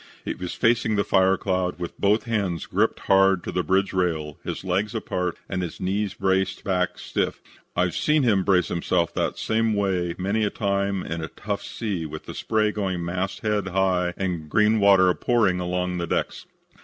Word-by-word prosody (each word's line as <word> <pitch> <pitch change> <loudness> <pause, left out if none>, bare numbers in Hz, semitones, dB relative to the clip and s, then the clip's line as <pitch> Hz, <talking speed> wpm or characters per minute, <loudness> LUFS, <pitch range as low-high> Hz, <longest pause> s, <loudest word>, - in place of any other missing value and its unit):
He - - -1
was 90 -1 -6
facing 115 -2 +2
the 100 - +2
fire 95 0 +3
cloud 90 -2 -1
with 85 -1 -7
both 105 +2 +3
hands 100 - -1
gripped - - 0
hard 95 -1 +4
to - - -4
the 90 - 0
bridge 95 +2 +1
rail, 80 -5 -1
his - - -5
legs 95 +4 -1
apart 90 -5 -2
and 95 -1 -2
his 85 -3 -5
knees 100 +2 -1
braced 95 0 0
back 90 -2 0
stiff. - - -2 0.4
I've 90 -1 +1
seen 150 -1 +2
him 105 -6 +3
brace 90 -3 +2
himself 85 0 0
that - - -1
same 110 0 +1
way 90 -4 0
many 100 +4 0
a 105 - +2
time 100 -2 -1
in 85 0 -4
a - - -3
tough 100 +4 -4
sea 100 -8 -4
with 75 +1 -8
the - - -7
spray 110 -1 +1
going 95 -5 -2
mast 95 +3 -3
head 105 -4 0
high 90 -1 +1
and 85 -5 -3
green 110 +4 +3
water 95 -3 +5
pouring 105 -4 +2
along 90 0 -2
the 85 - -2
decks. - - -2
95 Hz, 190 wpm, -24 LUFS, 90-105 Hz, 0.4 s, water